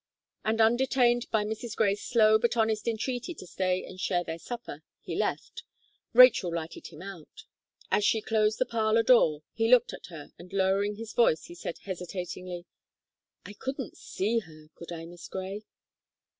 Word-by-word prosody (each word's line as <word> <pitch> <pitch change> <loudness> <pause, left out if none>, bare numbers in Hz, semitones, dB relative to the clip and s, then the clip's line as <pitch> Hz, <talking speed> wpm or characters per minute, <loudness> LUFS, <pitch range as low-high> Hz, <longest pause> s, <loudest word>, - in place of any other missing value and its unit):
And, 220 +1 0
undetained 240 +1 +3
by 215 -1 +1
Mrs. 220 +1 -5
Gray's 205 -2 +1
slow 220 -2 +4
but 235 +1 0
honest 220 -1 +1
entreaty 245 +7 -2
to 185 - -10
stay 185 0 -1
and 185 - -11
share 180 -2 0
their 165 -1 -6
supper, 230 -9 -7 0.2
he - - -6
left 465 - -2 0.5
Rachel 245 -7 +7
lighted 165 -1 -5
him 165 +1 -11
out. 190 -6 -10 0.5
As 210 - +3
she 220 - +3
closed 215 0 +1
the 255 - +1
parlour 225 -1 +2
door, 160 -12 +4
he 225 0 +1
looked 250 -1 +5
at - - -9
her, 160 -5 -10
and 175 +2 -12
lowering 195 +1 +1
his 225 +1 -8
voice, 165 -10 +3
he - - -10
said 175 -1 -6
hesitatingly: 180 -1 -6 0.8
"I 205 - -8
couldn't 265 +2 -5
see 220 +4 -1
her, 155 -6 -15
could 170 - -11
I, 165 -1 -6
Miss 175 0 -11
Gray?" 195 +3 -6
210 Hz, 170 wpm, -28 LUFS, 180-230 Hz, 0.8 s, Rachel